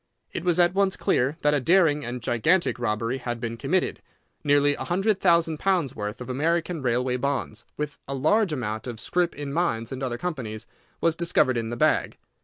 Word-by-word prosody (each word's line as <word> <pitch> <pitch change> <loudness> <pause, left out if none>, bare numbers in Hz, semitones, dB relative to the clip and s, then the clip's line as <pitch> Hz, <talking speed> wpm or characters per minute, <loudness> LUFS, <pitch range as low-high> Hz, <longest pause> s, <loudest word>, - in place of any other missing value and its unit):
It - - -4
was 180 -1 +2
at 175 0 +4
once 195 -1 +1
clear 135 +5 +1
that 150 0 +3
a 145 - +3
daring 155 0 +3
and 120 -1 -5
gigantic 160 +9 +2
robbery 115 +2 -1
had 120 -1 -4
been 115 -1 -4
committed. 145 +11 -1 0.4
Nearly 145 -1 +4
a - - -5
hundred 195 +3 +1
thousand 170 -3 +3
pounds' 180 -9 +1
worth 105 0 -4
of 125 - -7
American 165 +5 0
railway 125 0 0
bonds, 130 -5 -3
with 150 -1 -4
a 140 - -3
large 180 +8 +2
amount 110 -5 -3
of 120 -3 -6
scrip 175 +6 0
in 145 -1 -5
other - - -5
mines 140 -9 -1
and 130 -2 -3
companies, 125 -11 -4 0.4
was 165 -1 +2
discovered 165 -6 +2
in 115 -1 -2
the 120 - -4
bag. - - +1
140 Hz, 195 wpm, -25 LUFS, 120-170 Hz, 0.4 s, at